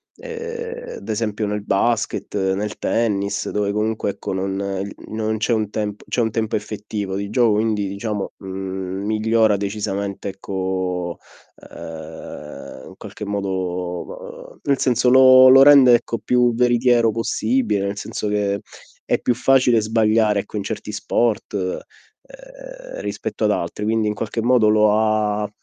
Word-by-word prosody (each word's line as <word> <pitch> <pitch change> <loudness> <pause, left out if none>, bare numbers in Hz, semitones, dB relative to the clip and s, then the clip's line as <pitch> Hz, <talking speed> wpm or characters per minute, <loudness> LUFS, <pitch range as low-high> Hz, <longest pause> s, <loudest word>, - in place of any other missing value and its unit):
ehm, 470 0 -7
ad - - -11
esempio 105 -1 -1
nel 105 0 -2
basket, 110 +3 -1 0.2
nel 105 +2 -3
tennis, 105 -3 -1
dove 100 -1 -1
comunque, 105 -1 -1
non 95 +1 -3 0.2
non 110 0 -2
c'è 110 +3 0
un 110 -3 +1
tem 105 -1 -2
c'è 125 - 0
un 110 -1 0
tempo 110 0 -1
effettivo 105 -2 -4
di 100 0 -4
gioco, 115 -2 +3
quindi, 105 -2 0
diciamo, 100 0 -4
mhmm, 95 0 -5
migliora 110 0 +2
decisamente 100 0 -3
ecco, 95 -2 -3 0.5
ehm, 80 -4 -9
in - - -12
qualche - - -8
modo, 95 -3 -4
mhmm, - - -24
nel 140 -2 +1
senso 125 0 +2
lo 130 0 +8
lo 135 +1 +9
rende, 135 -4 +8
ecco, 120 0 -2
più 125 -1 +2
veritiero 120 -1 +3
possibile, 110 -2 0
nel 100 +1 -4
senso 105 - -4
che 100 -1 0 0.4
è - - 0
più 125 - 0
facile 125 -2 +3
sbagliare, 110 -1 +2
ecco, 105 - -13
in 100 - -2
certi 105 0 -5
sport, 110 +1 -1
ehm, 95 -2 -4 1.1
rispetto - - -3
ad - - +3
altri, 105 - -3
quindi 110 0 +1
in - - -1
qualche 115 +2 -3
modo 120 -1 +4
lo 105 0 +4
ha 105 -1 +1
105 Hz, 145 wpm, -21 LUFS, 100-115 Hz, 1.1 s, lo